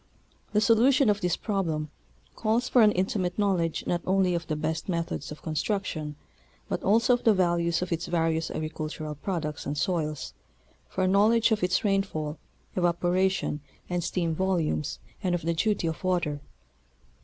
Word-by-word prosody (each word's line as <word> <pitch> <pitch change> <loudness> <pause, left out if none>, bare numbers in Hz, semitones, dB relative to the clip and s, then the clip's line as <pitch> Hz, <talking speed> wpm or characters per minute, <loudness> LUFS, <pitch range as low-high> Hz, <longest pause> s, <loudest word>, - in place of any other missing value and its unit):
The 210 - +3
solution 235 +2 +5
of 205 0 -2
this 180 -2 +1
problem 165 -8 -2 0.4
calls 230 +3 +1
for 250 - +5
an 210 -1 +7
intimate 185 -1 -1
knowledge 185 -6 +1
not 175 - 0
only 190 -1 +3
of 170 -1 -2
the 155 - -1
best 155 +3 -3
methods 165 -5 -2
of 150 - -9
construction, 155 -2 -2 0.5
but - - -2
also 230 +5 +4
of 245 - 0
the 220 -2 +5
values 170 -2 +1
of 180 - -6
its 170 0 -1
various 165 -1 0
agricultural 155 -1 -4
products 150 -1 -4
and 145 +1 -2
soils; 155 -5 -1 0.6
for 185 - -1
a - - +3
knowledge 215 +4 +4
of 215 - +2
its 180 0 +1
rainfall, 190 -7 -1 0.4
evaporation, 175 -2 +1 0.3
and 175 -1 0
steam 170 -1 -1
volumes 170 -4 0 0.2
and 180 -3 +1
of 175 - -4
the 170 +1 +1
duty 205 +2 0
of 165 +2 -3
water. 175 -6 0
175 Hz, 160 wpm, -27 LUFS, 160-195 Hz, 0.6 s, an